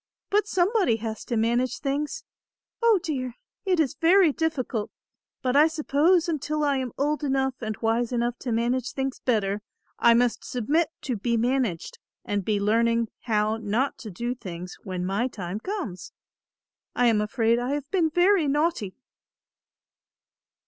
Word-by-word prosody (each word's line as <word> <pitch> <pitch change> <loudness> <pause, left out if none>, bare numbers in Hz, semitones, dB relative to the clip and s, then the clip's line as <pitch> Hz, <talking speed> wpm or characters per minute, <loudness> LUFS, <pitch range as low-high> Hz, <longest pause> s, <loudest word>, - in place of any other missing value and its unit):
But 415 +1 +2
somebody 375 - +2
has 220 -1 -5
to 235 - -1
manage 240 +3 +1
things. 285 +1 -2 0.6
Oh, 460 -4 +5
dear, 255 -6 -3 0.3
it 370 -3 +2
is 300 -3 +2
very 340 +1 +5
difficult, 265 -9 -2 0.5
but 255 0 +1
I 300 +2 +7
suppose 320 +2 +2
until 305 -1 -1
I 285 -2 +2
am 255 -2 -3
old 300 +2 0
enough 265 -1 +1
and 220 -2 -3
wise 230 +2 +1
enough 240 0 -1
to 245 - -4
manage 240 +2 0
things 270 -1 -3
better, 210 -4 0 0.4
I 235 -1 +6
must 245 0 +1
submit 290 +7 0
to 250 -5 -2
be 235 +3 0
managed 240 -7 -1 0.3
and 205 -1 -1
be 210 +1 0
learning 230 +2 +2 0.2
how 215 -1 +1
not 225 +5 -1
to 220 - -7
do 235 +6 -3
things 180 -6 -8
when 180 -2 -4
my 200 +7 0
time 195 -4 -5
comes. 295 - -5 0.8
I 245 - +3
am 225 -3 +4
afraid 230 +1 +1
I 250 +3 -1
have 290 -1 -5
been 345 -5 +2
very 355 0 +3
naughty." 290 - 0
250 Hz, 155 wpm, -26 LUFS, 225-300 Hz, 0.8 s, I